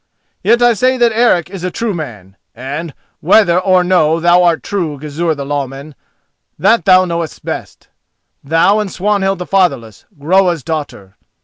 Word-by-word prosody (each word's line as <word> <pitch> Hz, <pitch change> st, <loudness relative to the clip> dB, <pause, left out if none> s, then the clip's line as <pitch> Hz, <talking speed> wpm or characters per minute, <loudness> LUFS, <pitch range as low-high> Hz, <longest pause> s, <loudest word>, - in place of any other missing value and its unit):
Yet 240 Hz, +1 st, +2 dB
I 240 Hz, -1 st, +5 dB
say 255 Hz, +4 st, +1 dB
that 240 Hz, -2 st, +3 dB
Eric 220 Hz, -7 st, +2 dB
is 190 Hz, -3 st, -8 dB
a 185 Hz, -, -1 dB
true 225 Hz, +3 st, -3 dB
man, 105 Hz, -, -8 dB, 0.2 s
and, 145 Hz, +5 st, -6 dB, 0.2 s
whether 180 Hz, 0 st, +3 dB
or 185 Hz, -1 st, +2 dB
no 170 Hz, -3 st, +2 dB
thou 175 Hz, +1 st, +4 dB
art 170 Hz, -2 st, +1 dB
true, 170 Hz, -8 st, -3 dB
Gizur 155 Hz, +3 st, -3 dB
the 140 Hz, -1 st, -6 dB
Lawman, 140 Hz, +1 st, -5 dB, 0.6 s
that 230 Hz, 0 st, +2 dB
thou 185 Hz, -1 st, +5 dB
knowest 170 Hz, -2 st, -5 dB
best—thou 165 Hz, +8 st, -3 dB
and 205 Hz, -3 st, -3 dB
Swanhild 195 Hz, 0 st, -1 dB
the 180 Hz, -, -6 dB
Fatherless, 140 Hz, -, -1 dB
Groa's 175 Hz, +1 st, +1 dB
daughter. 145 Hz, -12 st, -6 dB
175 Hz, 150 wpm, -14 LUFS, 150-195 Hz, 0.6 s, I